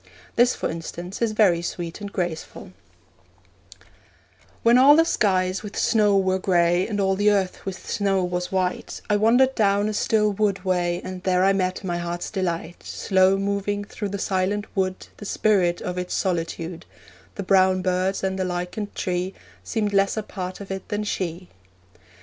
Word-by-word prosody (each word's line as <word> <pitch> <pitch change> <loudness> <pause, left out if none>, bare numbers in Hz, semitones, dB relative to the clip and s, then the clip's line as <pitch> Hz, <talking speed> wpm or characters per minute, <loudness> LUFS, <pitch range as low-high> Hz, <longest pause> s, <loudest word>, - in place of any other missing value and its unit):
This, 240 +1 +4
for - - -2
instance, 175 +4 -6
is 225 -2 +1
very 190 -6 +4
sweet 175 +2 -5
and 200 -1 -6
graceful: 175 -5 -4 1.9
When 235 +2 +6
all 280 +3 +8
the 325 +1 +5
skies 185 - +1
with 210 -1 -8
snow 210 -3 +3
were 190 -1 +1
grey, 175 -1 +2
And 210 -2 -3
all 195 -1 +2
the 205 +2 +3
earth 195 -3 0
with 190 -1 -6
snow 195 -2 +1
was 180 0 -2
white, 185 -1 -2
I - - +4
wandered 245 +5 +4
down 205 -3 +2
a 215 - -2
still 210 0 +2
wood 200 -2 -1
way, 175 -1 0
And 185 -1 -6
there 185 0 +2
I 195 +1 +4
met 185 -1 -1
my 175 -2 -2
heart's 175 0 -4
delight 175 -3 -3
Slow 190 0 +2
moving 200 +1 -1
through 205 0 -5
the 200 - -3
silent 195 +2 -1
wood, 185 -1 -1
The 205 - -9
spirit 190 -5 +1
of 180 0 -3
its 180 0 -3
solitude: 170 -2 -3 0.5
The 200 - -4
brown 185 -1 +3
birds 185 +1 0
and 190 0 -1
the - - +1
lichened 180 +3 -4
tree 180 0 -2 0.3
Seemed 210 -3 -1
less 195 +2 +2
a 215 - -1
part 185 -2 -6
of 200 -1 -8
it 190 -1 -5
than 210 0 -1
she. 180 -3 -3
190 Hz, 175 wpm, -24 LUFS, 180-205 Hz, 1.9 s, all